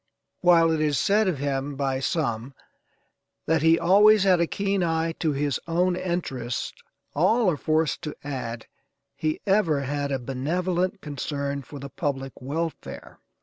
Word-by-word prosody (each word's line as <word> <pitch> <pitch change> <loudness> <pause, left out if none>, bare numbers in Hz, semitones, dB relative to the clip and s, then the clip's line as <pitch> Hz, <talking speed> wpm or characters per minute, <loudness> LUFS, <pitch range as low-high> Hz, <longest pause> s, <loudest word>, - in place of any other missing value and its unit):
While 170 -2 +5
it 160 -1 0
is 150 -2 +1
said 210 +1 +3
of 180 -6 0
him 140 0 -2
by 135 -1 -1
some 135 -3 -2 0.9
that 160 -1 +2
he 160 +1 +5
always 205 +4 +5
had 185 -3 +4
a 170 - +2
keen 200 0 -1
eye 165 0 0
to 160 - +1
his 140 -1 -1
own 175 +2 +1
interests 165 -10 -3 0.4
all 190 +6 +3
are - - -1
forced 155 +1 0
to 150 -3 -6
add 125 -5 -5 0.5
he 155 -1 -2
ever 190 -8 +2
had 140 +1 -2
a 135 - +1
benevolent 175 +9 -2
concern 140 -1 -3
for 140 +3 -11
the 140 0 -7
public 135 -1 -3
welfare. 160 +5 -5
155 Hz, 150 wpm, -25 LUFS, 140-175 Hz, 0.9 s, While